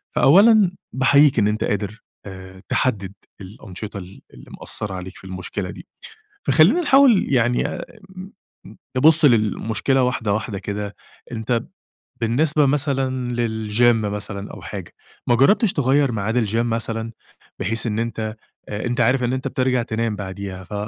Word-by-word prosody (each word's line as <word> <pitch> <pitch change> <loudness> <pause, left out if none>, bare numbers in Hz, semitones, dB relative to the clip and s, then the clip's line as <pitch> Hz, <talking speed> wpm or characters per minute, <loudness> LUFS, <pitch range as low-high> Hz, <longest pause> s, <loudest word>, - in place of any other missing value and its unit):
فأولًا 200 +4 +6 0.2
باحييك 140 +2 +4
إن 105 - +3
أنت 105 +1 -1
قادر 105 +1 -3 0.2
آآ، 95 -1 -10
تحدِّد 100 -7 -1 0.3
الأنشطة 100 +1 -8
ال 95 0 -10
اللي - - -15
مأثَّرة 105 -2 -5
عليك 95 +1 -8
في - - -16
المشكلة 95 0 -5
دي. - - -12 0.6
فخلينا 205 - +4
نحاول 270 - +5
يعني 120 -1 +2
أ - - -5 0.3
ام 190 +2 -9 0.6
نبُصّ 155 +3 +5
للمشكلة 115 +2 +2
واحدة 115 -4 -1
واحدة 105 -2 -3
كده، 100 +1 -5 0.4
أنت 115 +1 -1 0.6
بالنسبة 145 +6 +2
مثلًا 135 -3 -1
للGym 115 0 +2
مثلًا 100 -1 -6
أو - - -10
حاجة، - - -8 0.3
ما 120 - +4
جرَّبتش 195 - +3
تغيّر 140 -1 +2
ميعاد 110 +2 -1
الGym 110 - -3
مثلًا، 115 -1 -2 0.5
بحيث 115 +3 -2
إن 110 +1 -1
أنت 110 -1 -3 0.3
أ 105 +3 -4
أنت 120 +1 0
عارف 125 +2 +2
إن 120 +1 0
أنت 130 0 -2
بترجع 130 -1 0
تنام 115 -1 -2
بعديها، 95 -1 -7
ف 95 - -12
115 Hz, 145 wpm, -21 LUFS, 105-130 Hz, 0.6 s, فأولًا